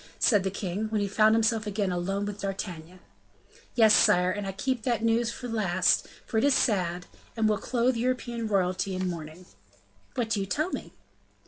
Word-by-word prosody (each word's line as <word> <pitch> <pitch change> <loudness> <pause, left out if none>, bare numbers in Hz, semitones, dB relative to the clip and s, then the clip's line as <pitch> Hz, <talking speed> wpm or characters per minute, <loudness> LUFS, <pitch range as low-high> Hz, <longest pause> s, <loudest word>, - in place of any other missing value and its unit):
said 205 -5 +3
the 190 - 0
king, 195 +1 -3
when 215 -1 0
he 200 - 0
found 215 +2 +4
himself 225 -1 +1
again 200 -2 -1
alone 195 +3 -2
with 205 0 -6
D'Artagnan. 185 -3 -6 0.7
"Yes, 220 -3 +6
sire, 180 -1 +5
and 205 +1 -4
I - - -2
kept 245 +5 -2
that 235 -1 -1
news 230 +1 +2
for 245 - -7
the 230 - -5
last, 185 -4 +2 0.2
for 220 - 0
it - - 0
is 285 -1 +4
sad, 180 -5 0 0.3
and 220 -1 +2
will 210 -1 +1
clothe 245 +1 0
European 240 -1 -2
royalty 190 -1 0
in 185 0 -2
mourning." 165 0 -7 0.7
"What 230 -3 -2
do 210 - +1
you 195 - -3
tell 310 - -1
me?" - - -5
205 Hz, 195 wpm, -27 LUFS, 185-230 Hz, 0.7 s, Yes